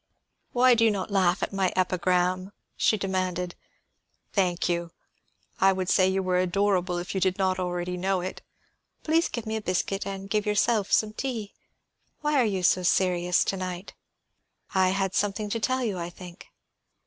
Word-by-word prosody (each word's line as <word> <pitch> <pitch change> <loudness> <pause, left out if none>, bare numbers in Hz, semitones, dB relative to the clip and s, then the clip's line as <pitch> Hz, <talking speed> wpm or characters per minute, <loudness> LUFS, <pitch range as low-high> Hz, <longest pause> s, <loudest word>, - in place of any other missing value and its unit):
"Why 250 +1 +5
do 230 -1 +3
you 225 - +6
not 200 -1 -3
laugh 185 -2 +2
at - - -3
my 190 -2 +1
epigram?" 185 +1 +1 0.2
she 215 - +2
demanded. 185 -2 -2 0.8
"Thank 180 -3 +1
you; 170 -1 -1 0.7
I 195 0 +5
would 185 -1 -2
say 185 -1 +4
you 190 0 0
were 180 -1 +1
adorable 185 -1 +1
if 175 +1 -4
you 190 - -1
did 185 0 +1
not 190 -1 +1
already 180 0 -2
know 190 +1 0
it. 185 +1 -6 0.6
Please 325 +2 +2
give 235 -2 -5
me 220 0 -2
a - - -4
biscuit, 195 +1 -1
and 195 0 -5
give 210 +1 -1
yourself 210 0 +1
some 215 -1 +2
tea. 225 -4 -4 0.7
Why 300 -2 +2
are - - +3
you 195 -4 -1
so 185 - +4
serious 180 -1 +2
to 195 - -1
night?" 185 0 -5 0.8
"I 190 -1 +3
had 195 0 -1
something 205 0 -1
to 230 - -1
tell 255 +3 0
you, 205 -6 -2
I 170 0 -4
think." 175 +1 -12
190 Hz, 175 wpm, -26 LUFS, 180-205 Hz, 0.8 s, you